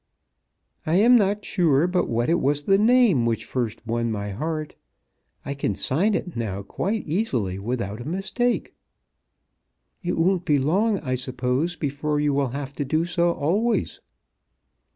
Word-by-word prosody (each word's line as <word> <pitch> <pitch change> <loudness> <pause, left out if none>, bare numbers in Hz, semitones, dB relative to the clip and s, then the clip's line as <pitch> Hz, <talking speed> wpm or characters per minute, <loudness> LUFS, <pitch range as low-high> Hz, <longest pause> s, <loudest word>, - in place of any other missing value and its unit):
"I 160 - 0
am 230 +6 +6
not 205 -2 +2
sure 160 -4 +2
but 180 0 0
what 120 +1 0
it 170 +1 +2
was 145 +2 +1
the 195 +5 +3
name 225 - +4
which 115 -1 -1
first 115 -3 -3
won 115 0 -1
my 100 -1 -3
heart. 155 +7 -4 0.7
I 140 - -3
can 120 -7 -2
sign 190 - +1
it 180 - -4
now 100 -4 -3
quite 195 - -3
easily 125 - -1
without 110 0 -3
a - - -8
mistake." 195 +7 -1 1.3
"It 175 -2 -2
won't 180 +2 +2
be 150 -5 +2
long, 195 +10 +2
I 130 -3 -2
suppose, 130 +6 -1
before 150 0 -2
you 145 -1 +1
will 140 -2 +1
have 140 +1 -5
to 145 - 0
do 155 +4 0
so 175 0 +1
always?" 200 +12 0
150 Hz, 155 wpm, -24 LUFS, 125-185 Hz, 1.3 s, am